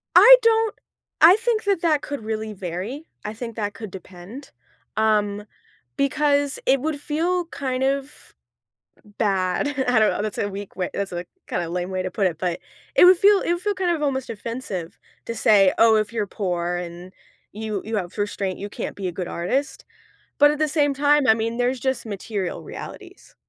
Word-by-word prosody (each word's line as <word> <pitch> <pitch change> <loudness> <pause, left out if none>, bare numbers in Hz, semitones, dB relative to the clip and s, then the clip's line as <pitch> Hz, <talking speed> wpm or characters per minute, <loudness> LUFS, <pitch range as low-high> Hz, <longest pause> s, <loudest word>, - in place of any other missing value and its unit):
I - - +11
don't 450 -1 +2 0.5
I 340 +4 +9
think 460 0 0
that 395 -4 +1
that 310 -4 +2
could 285 -5 -6
really 220 0 -4
vary. 195 - -6 0.2
I 210 - -4
think 230 0 -7
that 205 -2 -3
could 215 +1 -8
depend, 190 +7 -11 0.5
um, 210 -1 +1 0.5
because 285 0 +1
it 270 +1 +4
would 305 0 -2
feel 340 +4 -1
kind 260 -5 -3
of 275 +1 -3 0.9
bad, 190 +3 +1 0.2
I 245 -2 +4
don't 215 - +4
know, - - -2
that's 215 -1 -4
a 205 - 0
weak 200 0 -8
way 180 - -2
that's 200 -2 -3
a 175 +1 -4 0.2
kinda 170 -1 -2
lame 180 +1 -3
way 185 -1 -2
to 185 - -4
put 205 -4 0
it, 165 -4 -2
but 175 -1 -2 0.4
it - - +8
would 365 +1 +8
feel 405 +1 +5
it - - 0
would 345 +1 -3
feel 415 -1 0
kind 370 -2 0
of 325 -3 -1
almost 265 -3 -1
offensive 215 -6 -6 0.3
to 230 - -4
say, 200 -4 +5
"Oh, 225 -1 +6
if 215 +1 0
you're 215 -3 -1
poor 175 -4 -2
and 175 +1 -7 0.4
you 215 -1 -4
you 220 0 -3
have 180 -4 -4
restraint, 200 -2 -2
you 200 - -5
can't - - -5
be 195 - -4
a 175 - -4
good 180 0 -5
artist," 265 +12 -2 0.6
but 290 0 +7
at 300 - -4
the 310 - +2
same 290 -2 +2
time, 290 0 +3
I 220 - +7
mean, 225 +1 -2
there's 245 +1 0
just 265 -1 -2
material 200 -2 -4
realities, 380 -1 -10
225 Hz, 195 wpm, -23 LUFS, 195-290 Hz, 0.9 s, I